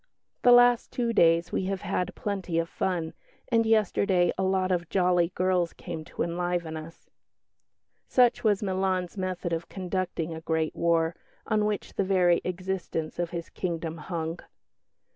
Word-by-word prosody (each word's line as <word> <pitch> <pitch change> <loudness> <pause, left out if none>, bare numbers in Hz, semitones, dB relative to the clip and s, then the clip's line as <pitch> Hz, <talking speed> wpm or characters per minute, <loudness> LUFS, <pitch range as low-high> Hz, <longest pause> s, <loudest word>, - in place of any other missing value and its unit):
The 245 - +6
last 245 0 +6
two 235 -2 -1
days 170 -3 +4
we 190 - -1
have 195 0 -2
had 180 - -2
plenty 190 -5 -3
of 165 0 +1
fun, 170 -2 -2 0.4
and 230 -2 +3
yesterday 200 -4 +3
a - - -3
lot 190 0 +1
of 175 -2 -1
jolly 180 -2 +2
girls 180 -2 +1
came 165 -3 -7
to - - -3
enliven 175 -1 -2
us." 160 +1 -10 1.0
Such 245 -1 +3
was 210 -2 +2
Milan's 185 -2 -1
method 185 -2 -3
of 165 0 -3
conducting 185 -3 -3
a 160 - -7
great 160 -1 -1
war, 165 -1 +1 0.3
on 215 -1 +1
which 210 -1 -2
the - - 0
very 180 -2 +3
existence 180 -3 -3
of 175 -1 -1
his 170 -1 -6
kingdom 165 -2 -3
hung. 165 +1 -4
180 Hz, 155 wpm, -27 LUFS, 170-190 Hz, 1.0 s, The